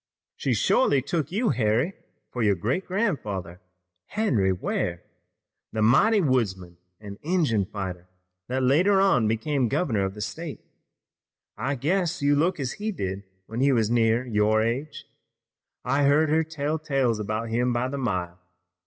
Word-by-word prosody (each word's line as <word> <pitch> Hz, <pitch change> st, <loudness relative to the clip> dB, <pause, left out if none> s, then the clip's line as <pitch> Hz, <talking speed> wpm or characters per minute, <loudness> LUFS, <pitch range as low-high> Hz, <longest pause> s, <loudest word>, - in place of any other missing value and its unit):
"She -, -, 0 dB
shorely 145 Hz, -, +3 dB
took 155 Hz, 0 st, -2 dB
you, 220 Hz, +5 st, +1 dB
Harry, 115 Hz, -, +1 dB, 0.4 s
for 125 Hz, -, -3 dB
your 105 Hz, -3 st, +3 dB
great 125 Hz, -, -2 dB
grandfather, 105 Hz, -, -2 dB, 0.5 s
Henry 125 Hz, -, +1 dB
Ware, 90 Hz, -1 st, -2 dB, 0.7 s
the 110 Hz, -, 0 dB
mighty 200 Hz, -, +4 dB
woodsman 95 Hz, -, -1 dB, 0.2 s
and 100 Hz, -1 st, -10 dB
Injun 150 Hz, -, +1 dB
fighter 95 Hz, -3 st, -6 dB, 0.4 s
that 130 Hz, +1 st, -1 dB
later 180 Hz, +10 st, +4 dB
on 130 Hz, -, +3 dB
became 120 Hz, +4 st, 0 dB
governor 125 Hz, -, 0 dB
of 95 Hz, +1 st, -3 dB
the 105 Hz, -, -7 dB
state. 135 Hz, -, -6 dB, 0.9 s
I 140 Hz, -, -2 dB
guess 175 Hz, +5 st, 0 dB
you 145 Hz, 0 st, +3 dB
look 165 Hz, +4 st, +1 dB
as 130 Hz, -2 st, -2 dB
he 215 Hz, +1 st, -3 dB
did 95 Hz, -, -4 dB, 0.2 s
when 115 Hz, +4 st, -6 dB
he 140 Hz, +2 st, +4 dB
was 115 Hz, -3 st, +1 dB
near 115 Hz, +1 st, +2 dB
your 110 Hz, -1 st, +2 dB
age. 130 Hz, +7 st, -3 dB, 0.8 s
I've 140 Hz, +2 st, +2 dB
heard 150 Hz, +2 st, +4 dB
her 160 Hz, +1 st, +3 dB
tell 155 Hz, 0 st, -3 dB
tales 135 Hz, -7 st, 0 dB
about 110 Hz, +2 st, -3 dB
him 120 Hz, +2 st, +1 dB
by 120 Hz, +1 st, 0 dB
the 140 Hz, +1 st, -4 dB
mile. 90 Hz, -8 st, -2 dB
125 Hz, 155 wpm, -25 LUFS, 105-155 Hz, 0.9 s, mighty